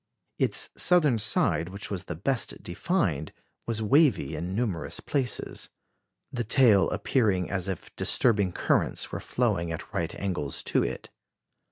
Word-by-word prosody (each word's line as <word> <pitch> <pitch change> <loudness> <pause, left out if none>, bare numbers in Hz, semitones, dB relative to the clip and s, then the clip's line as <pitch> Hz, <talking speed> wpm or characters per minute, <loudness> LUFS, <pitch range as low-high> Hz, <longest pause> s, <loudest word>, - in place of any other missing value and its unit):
Its - - +1
southern 155 -10 +3
side, 85 -4 +2
which 100 +2 -7
was 95 -4 -4
the 90 - -5
best 125 - -1
defined, 85 - -1 0.4
was 110 -1 -1
wavy 135 - +3
in 90 +5 -4
numerous 105 -7 -2
places, 135 -4 -2 0.6
the 120 -2 -1
tail 115 -4 +4
appearing 100 -9 0
as 100 -2 -1
if 95 -3 -6
disturbing 100 -6 +3
currents - - 0
were - - -4
flowing 100 -9 -1
at 80 +6 -7
right 85 -5 -2
angles 90 -8 -3
to - - +1
it. - - -4
100 Hz, 140 wpm, -27 LUFS, 90-120 Hz, 0.6 s, tail